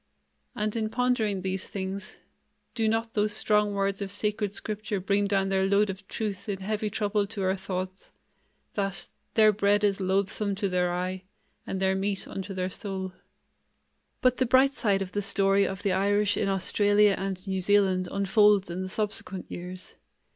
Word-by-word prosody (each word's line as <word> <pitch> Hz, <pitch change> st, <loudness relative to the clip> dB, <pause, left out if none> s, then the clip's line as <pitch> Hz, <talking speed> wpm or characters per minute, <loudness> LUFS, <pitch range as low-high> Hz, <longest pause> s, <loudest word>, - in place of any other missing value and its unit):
And 210 Hz, +1 st, -2 dB
in 220 Hz, -1 st, -1 dB
pondering 225 Hz, -6 st, 0 dB
these 190 Hz, 0 st, -3 dB
things, 195 Hz, 0 st, -5 dB, 0.6 s
do 225 Hz, -2 st, 0 dB
not 225 Hz, +1 st, -1 dB
those 210 Hz, 0 st, +1 dB
strong 210 Hz, -1 st, +2 dB
words 195 Hz, 0 st, 0 dB
of 200 Hz, -, -3 dB
Sacred 210 Hz, +1 st, -1 dB
Scripture 210 Hz, 0 st, -3 dB
bring 200 Hz, +2 st, +1 dB
down 195 Hz, -1 st, +1 dB
their 190 Hz, 0 st, +2 dB
load 200 Hz, +1 st, +3 dB
of 195 Hz, +1 st, -12 dB
truth 210 Hz, -2 st, -4 dB
in 195 Hz, -2 st, -2 dB
heavy 215 Hz, +2 st, -1 dB
trouble 205 Hz, -1 st, 0 dB
to 205 Hz, -2 st, -4 dB
our 190 Hz, +1 st, +2 dB
thoughts, 185 Hz, 0 st, -5 dB, 0.6 s
that, 195 Hz, -3 st, -2 dB, 0.3 s
'Their 215 Hz, -1 st, +7 dB
bread 205 Hz, 0 st, +2 dB
is 200 Hz, -1 st, +2 dB
loathsome 195 Hz, +2 st, 0 dB
to 200 Hz, +1 st, -1 dB
their 180 Hz, -1 st, +1 dB
eye, 185 Hz, +1 st, -3 dB, 0.4 s
and 190 Hz, -, -3 dB
their 190 Hz, 0 st, +2 dB
meat 195 Hz, +1 st, -1 dB
unto 195 Hz, 0 st, -6 dB
their 185 Hz, -1 st, -2 dB
soul.'" 190 Hz, -2 st, -5 dB, 1.1 s
But 255 Hz, -1 st, +3 dB
the 255 Hz, -, +1 dB
bright 265 Hz, +3 st, +5 dB
side 195 Hz, -5 st, +1 dB
of 185 Hz, -, -9 dB
the 205 Hz, -, -1 dB
story 195 Hz, 0 st, +3 dB
of 195 Hz, +1 st, -5 dB
the 200 Hz, -, +2 dB
Irish 205 Hz, +2 st, +2 dB
in 200 Hz, -, 0 dB
Australia 205 Hz, +2 st, +3 dB
and 190 Hz, 0 st, -4 dB
New 190 Hz, -1 st, -1 dB
Zealand 190 Hz, -1 st, +3 dB
unfolds 200 Hz, -1 st, +3 dB
in 180 Hz, +2 st, -3 dB
the 185 Hz, -, -4 dB
subsequent 205 Hz, -2 st, -3 dB
years. 180 Hz, +1 st, -6 dB
200 Hz, 175 wpm, -27 LUFS, 190-210 Hz, 1.1 s, Their